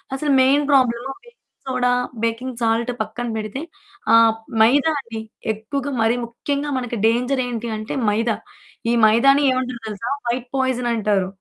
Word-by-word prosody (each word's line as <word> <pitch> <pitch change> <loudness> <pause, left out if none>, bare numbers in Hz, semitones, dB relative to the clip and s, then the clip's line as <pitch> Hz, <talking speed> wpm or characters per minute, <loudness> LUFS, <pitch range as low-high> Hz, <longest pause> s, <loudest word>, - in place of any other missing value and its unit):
అసలు 290 +1 -1
main 280 +3 +4
problem 255 -1 +2
baking 475 0 -19 0.3
soda, 250 -1 +1 0.3
baking 235 +2 -2
salt 230 +2 +1
పక్కన 225 +3 -4
బెడితే 215 +5 -4 0.5
ఆహ్, 230 -1 +7 0.3
మైదా 280 +8 +5
అండి. 230 -4 -7 0.3
ఎక్కువగా 275 +6 -4
మరి 225 +2 +3
ముఖ్యంగా 285 +5 -3
మనకి 245 -2 -3
డేంజర్ 250 +3 +1
ఏంటి 235 -1 -4
అంటే 215 +1 -5 0.2
మైదా. 225 +1 +1 0.6
ఈ - - +2
మైదాని 275 +6 +5
ఏమంటారు 255 -2 -2
తెలుసా! 215 +3 -5 0.2
వైట్ 245 +1 -2
పాయిజన్ 255 -2 0
అంటారు. 205 -4 +1
240 Hz, 140 wpm, -21 LUFS, 225-265 Hz, 0.6 s, ఆహ్